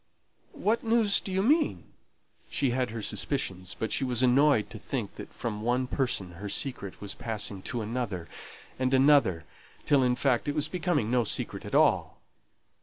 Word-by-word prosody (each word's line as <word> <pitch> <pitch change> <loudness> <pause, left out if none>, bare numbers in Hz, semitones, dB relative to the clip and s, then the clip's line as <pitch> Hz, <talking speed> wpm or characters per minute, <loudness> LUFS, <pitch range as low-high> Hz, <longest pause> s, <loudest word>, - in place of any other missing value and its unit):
"What 225 +3 +1
news 225 -3 +3
do 195 - -7
you 190 +1 +1
mean?" 300 +7 +2 0.7
She 135 -3 0
had 125 0 0
her 110 -1 -5
suspicions; 95 -5 -2
but 110 - -3
she - - 0
was 125 -1 +2
annoyed 130 -2 +4
to - - -7
think - - -4
that - - -10
from 105 -3 -4
one 125 +3 +1
person 125 -9 -2
her 105 - -4
secret 100 -4 -2
was 100 - -5
passing 105 -3 -4
to 120 +3 -3
another 105 -7 -3 0.5
and 130 +1 +2
another, 130 - +4 0.4
till, 140 -2 +4
in 125 -1 +2
fact, 130 0 +1
it 145 - -1
was 150 -1 +2
becoming 165 - -1
no 125 -1 +3
secret 105 - -3
at - - -4
all. - - +3
125 Hz, 175 wpm, -28 LUFS, 105-145 Hz, 0.7 s, annoyed